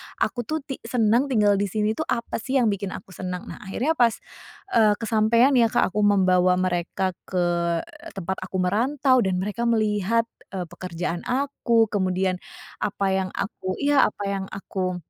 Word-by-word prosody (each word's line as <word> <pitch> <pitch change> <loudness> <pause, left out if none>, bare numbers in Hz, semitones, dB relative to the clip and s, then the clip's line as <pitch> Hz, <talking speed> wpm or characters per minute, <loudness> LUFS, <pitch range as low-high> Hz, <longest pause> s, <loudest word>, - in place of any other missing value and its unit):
aku, - - -1
tuh, 315 -1 -2
ti 270 -2 -6
senang 235 +2 +2
tinggal 210 -6 +3
di 205 - +1
sini, 210 +2 0
tuh, 315 +8 -3
apa, 235 -1 -2
sih, 260 +4 -3
yang 240 -5 +4
bikin 200 -1 -4
aku 190 - -11
senang, 180 0 -5
nah, - - -9
akhirnya 230 +9 -1
pas, 240 -8 +3 0.6
eee, 215 -2 +4
kesampean, 230 +3 +3
ya, 230 - +5
Kak, 220 - +1
aku 210 - -2
membawa 185 -3 +4
mereka 185 +1 -1 0.2
ke 180 -1 0 0.7
tempat 190 0 -3
aku 185 0 -8
merantau 255 +7 +2
dan 190 -4 +1
mereka 210 +6 -2
melihat, 220 0 +2 0.3
eee, 185 - -2
pekerjaan 175 -1 -4
aku, 245 -4 +1
kemudian 185 -2 0 0.4
apa 200 -1 -1
yang 190 -1 0
aku 185 -2 -3
iya, 290 -1 +5
apa 205 - -6
yang 190 -1 -3
aku, 185 -2 -4
205 Hz, 165 wpm, -24 LUFS, 185-235 Hz, 0.7 s, ya